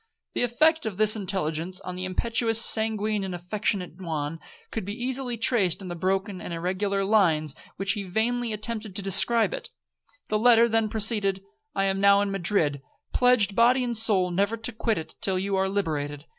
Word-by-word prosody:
The -, -, -2 dB
effect 310 Hz, +5 st, +2 dB
of 200 Hz, -4 st, -5 dB
this 215 Hz, 0 st, +4 dB
intelligence 185 Hz, -3 st, -3 dB
on 180 Hz, -, -7 dB
the 185 Hz, 0 st, -5 dB
impetuous, 225 Hz, +4 st, 0 dB
sanguine, 215 Hz, -2 st, +3 dB
and 185 Hz, -2 st, -4 dB
affectionate 180 Hz, 0 st, -3 dB
Juan, 160 Hz, -2 st, -4 dB, 0.3 s
could 220 Hz, -, -4 dB
be 205 Hz, +2 st, -6 dB
easily 250 Hz, -1 st, -2 dB
traced 225 Hz, -7 st, +2 dB
in 190 Hz, -2 st, -8 dB
the 175 Hz, -, -5 dB
broken 190 Hz, +2 st, -2 dB
and -, -, -7 dB
irregular 190 Hz, +4 st, -2 dB
lines 165 Hz, -8 st, +2 dB
in -, -, -18 dB
which 195 Hz, 0 st, -1 dB
he 205 Hz, 0 st, -3 dB
vainly 225 Hz, +5 st, -1 dB
attempted 215 Hz, -1 st, -4 dB
to 200 Hz, -, -1 dB
describe 210 Hz, +2 st, +4 dB
it. -, -, -6 dB, 0.6 s
The 215 Hz, -, 0 dB
letter 235 Hz, 0 st, +5 dB
then 225 Hz, -1 st, 0 dB
proceeded. 205 Hz, -3 st, +1 dB, 0.3 s
'I 195 Hz, -, +1 dB
am 195 Hz, 0 st, 0 dB
now 200 Hz, 0 st, +5 dB
in 205 Hz, -1 st, -1 dB
Madrid, 170 Hz, -7 st, 0 dB, 0.3 s
pledged 245 Hz, -5 st, +3 dB
body 250 Hz, +2 st, +4 dB
and 240 Hz, -1 st, -2 dB
soul 205 Hz, -5 st, +2 dB
never 200 Hz, +5 st, 0 dB
to 225 Hz, +3 st, -2 dB
quit 225 Hz, 0 st, -1 dB
it 160 Hz, -, -7 dB
till 190 Hz, -1 st, 0 dB
you 195 Hz, +1 st, -2 dB
are 190 Hz, 0 st, 0 dB
liberated. 150 Hz, -7 st, -3 dB
200 Hz, 185 wpm, -25 LUFS, 185-225 Hz, 0.6 s, letter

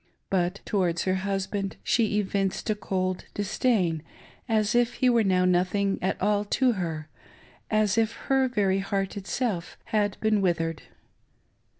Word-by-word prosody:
But 180 Hz, 0 st, 0 dB
towards 175 Hz, -4 st, 0 dB
her 185 Hz, -, +1 dB, 0.2 s
husband 195 Hz, 0 st, -2 dB
she 220 Hz, -3 st, +2 dB
evinced 195 Hz, -1 st, -1 dB
a -, -, +3 dB
cold 185 Hz, -3 st, -2 dB
dis 205 Hz, 0 st, -3 dB
dain, 180 Hz, -11 st, +2 dB, 0.5 s
as 215 Hz, -2 st, +2 dB
if 240 Hz, 0 st, +2 dB
he 255 Hz, -1 st, +3 dB
were 235 Hz, -2 st, +4 dB
now 185 Hz, -2 st, +3 dB
nothing 185 Hz, +2 st, +1 dB
at 190 Hz, +1 st, -1 dB
all 205 Hz, +1 st, +2 dB
to 250 Hz, +5 st, +2 dB
her 165 Hz, -7 st, -3 dB, 0.3 s
— -, -, -25 dB, 0.2 s
as 215 Hz, 0 st, +2 dB
if 225 Hz, 0 st, +1 dB
her 265 Hz, +2 st, +1 dB
very 200 Hz, -6 st, +1 dB
heart 195 Hz, 0 st, -2 dB
itself 200 Hz, -2 st, -3 dB, 0.2 s
had 205 Hz, -2 st, +1 dB
been 215 Hz, -2 st, +2 dB
withered. 165 Hz, -3 st, 0 dB
200 Hz, 155 wpm, -27 LUFS, 185-215 Hz, 0.5 s, were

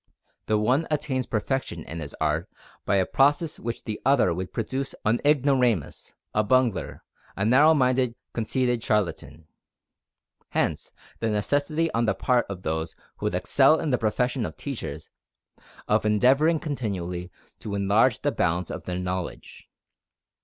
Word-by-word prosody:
The 110 Hz, -, +2 dB
one 130 Hz, +9 st, +1 dB
attains 140 Hz, -4 st, -1 dB
perfection 110 Hz, -, -2 dB
in 80 Hz, -, -7 dB
his 75 Hz, -3 st, -7 dB
art -, -, 0 dB, 0.4 s
by 100 Hz, -, +2 dB
a 95 Hz, -1 st, +3 dB
process 145 Hz, -, +2 dB
which 115 Hz, 0 st, -4 dB
in -, -, -37 dB
the 110 Hz, -2 st, -5 dB
other 135 Hz, -10 st, +3 dB
would 90 Hz, +2 st, -5 dB
produce 130 Hz, +4 st, -3 dB
an 110 Hz, +3 st, +2 dB
ignoramus, 130 Hz, -, +1 dB, 0.2 s
a 105 Hz, -, +2 dB
bungler, 125 Hz, 0 st, +1 dB, 0.3 s
a 100 Hz, -, -1 dB
narrow 145 Hz, +8 st, +6 dB
minded, 125 Hz, -3 st, +2 dB, 0.2 s
conceited 120 Hz, +1 st, 0 dB
charlatan. 95 Hz, -7 st, -1 dB, 1.0 s
Hence -, -, -1 dB, 0.3 s
the 115 Hz, -, 0 dB
necessity 145 Hz, +9 st, 0 dB
on 115 Hz, +1 st, +1 dB
the 100 Hz, -3 st, +1 dB
part 125 Hz, +5 st, +1 dB
of 95 Hz, -2 st, -6 dB
those 80 Hz, +1 st, -2 dB, 0.2 s
who -, -, -2 dB
would -, -, -1 dB
excel 160 Hz, -, +4 dB
in 155 Hz, -, -1 dB
the 125 Hz, -, +2 dB
profession 120 Hz, +3 st, 0 dB
of 80 Hz, -6 st, -5 dB
teachers, -, -, -6 dB, 0.8 s
of -, -, +2 dB
endeavoring 135 Hz, +10 st, +3 dB
continually 95 Hz, -, -4 dB, 0.3 s
to 100 Hz, -2 st, -5 dB
enlarge 105 Hz, +4 st, +3 dB
the 145 Hz, -, +2 dB
bounds 90 Hz, -4 st, 0 dB
of -, -, -7 dB
their 90 Hz, -1 st, -3 dB
knowledge. 90 Hz, -1 st, -5 dB
115 Hz, 150 wpm, -25 LUFS, 100-135 Hz, 1.0 s, narrow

